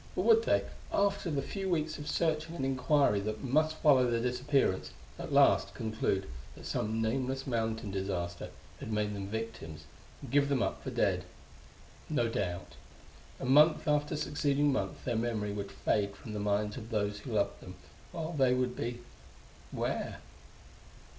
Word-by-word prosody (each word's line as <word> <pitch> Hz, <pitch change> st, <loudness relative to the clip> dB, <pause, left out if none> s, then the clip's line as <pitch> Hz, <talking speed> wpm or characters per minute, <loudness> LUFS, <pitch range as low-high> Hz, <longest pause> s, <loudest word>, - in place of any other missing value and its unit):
or -, -, 0 dB
would 455 Hz, -1 st, +6 dB
they, -, -, +3 dB, 0.3 s
after 200 Hz, -2 st, +1 dB
the 140 Hz, -3 st, -1 dB
few 195 Hz, +5 st, -3 dB
weeks 155 Hz, -3 st, 0 dB
of 150 Hz, 0 st, -5 dB
searching 160 Hz, +1 st, 0 dB
and 135 Hz, -, -2 dB
inquiry 135 Hz, -4 st, +3 dB
that 110 Hz, +4 st, -4 dB
must 155 Hz, +4 st, +2 dB
follow 130 Hz, -6 st, +5 dB
their 115 Hz, -1 st, +1 dB
disappearance, 125 Hz, -3 st, +1 dB, 0.3 s
at -, -, -5 dB
last -, -, +4 dB
conclude 110 Hz, -3 st, -1 dB, 0.3 s
that -, -, -12 dB
some 110 Hz, +2 st, -1 dB
nameless 130 Hz, +3 st, -1 dB
mountain 110 Hz, -3 st, -1 dB
disaster 90 Hz, -3 st, -3 dB, 0.3 s
had 110 Hz, -, -6 dB
made 105 Hz, -1 st, 0 dB
them 100 Hz, -1 st, -4 dB
victims, 105 Hz, -8 st, -5 dB, 0.4 s
and 135 Hz, -, -9 dB
give 140 Hz, 0 st, +3 dB
them 135 Hz, -4 st, +2 dB
up -, -, -2 dB
for -, -, -3 dB
dead? -, -, +1 dB, 0.9 s
No 130 Hz, -7 st, +1 dB
doubt. 95 Hz, -5 st, -3 dB, 0.7 s
And 130 Hz, -, -3 dB
month 155 Hz, +3 st, +6 dB
after 150 Hz, +1 st, +1 dB
succeeding 145 Hz, -1 st, +1 dB
month -, -, -3 dB
their 120 Hz, -, 0 dB
memory 110 Hz, -2 st, -1 dB
would 100 Hz, -1 st, -5 dB
fade 100 Hz, -1 st, 0 dB
from 110 Hz, -, -9 dB
the 105 Hz, -, -3 dB
minds 105 Hz, +1 st, 0 dB
of 115 Hz, -2 st, -8 dB
those 105 Hz, -2 st, -1 dB
who 115 Hz, -, -9 dB
had -, -, +2 dB
loved 100 Hz, -, 0 dB
them, 90 Hz, 0 st, -10 dB, 0.4 s
while 165 Hz, 0 st, -4 dB
they 130 Hz, -4 st, +3 dB
would 125 Hz, -1 st, 0 dB
be 120 Hz, +1 st, -4 dB, 0.7 s
where?... -, -, -2 dB
125 Hz, 165 wpm, -32 LUFS, 105-145 Hz, 0.9 s, would